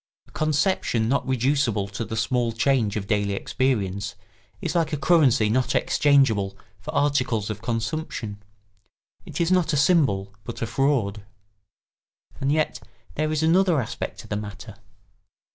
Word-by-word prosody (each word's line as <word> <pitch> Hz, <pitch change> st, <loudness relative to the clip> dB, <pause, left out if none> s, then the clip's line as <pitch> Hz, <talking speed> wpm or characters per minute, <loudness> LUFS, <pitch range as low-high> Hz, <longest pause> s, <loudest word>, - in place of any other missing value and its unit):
A -, -, -21 dB
conception 150 Hz, -, +1 dB
not 135 Hz, +1 st, 0 dB
reducible 130 Hz, -5 st, +1 dB
to 105 Hz, +3 st, -4 dB
the 110 Hz, 0 st, -5 dB
small 120 Hz, 0 st, 0 dB
change 115 Hz, -3 st, +1 dB
of 105 Hz, -2 st, -3 dB
daily 100 Hz, -1 st, 0 dB
experience 100 Hz, -4 st, -1 dB, 0.4 s
is -, -, -3 dB
like 165 Hz, -2 st, +1 dB
a 150 Hz, -, -1 dB
currency 140 Hz, -7 st, +4 dB
not 125 Hz, +4 st, +1 dB
exchangeable 110 Hz, -9 st, +3 dB, 0.2 s
for -, -, -10 dB
articles 125 Hz, -7 st, +1 dB
of 105 Hz, 0 st, -7 dB
consumption; 115 Hz, -3 st, -3 dB, 0.9 s
it -, -, -6 dB
is 170 Hz, +1 st, +1 dB
not 180 Hz, -3 st, +2 dB
a -, -, +2 dB
symbol, 135 Hz, -, +2 dB
but 115 Hz, +1 st, -6 dB
a -, -, +1 dB
fraud. 115 Hz, -6 st, 0 dB, 1.2 s
And 135 Hz, +1 st, 0 dB
yet 150 Hz, -4 st, 0 dB, 0.3 s
there 155 Hz, +1 st, -1 dB
is 155 Hz, 0 st, 0 dB
another 175 Hz, 0 st, +4 dB
aspect 115 Hz, -, -5 dB
to -, -, -14 dB
the 105 Hz, -, -3 dB
matter. 105 Hz, 0 st, -8 dB
125 Hz, 145 wpm, -24 LUFS, 105-145 Hz, 1.2 s, currency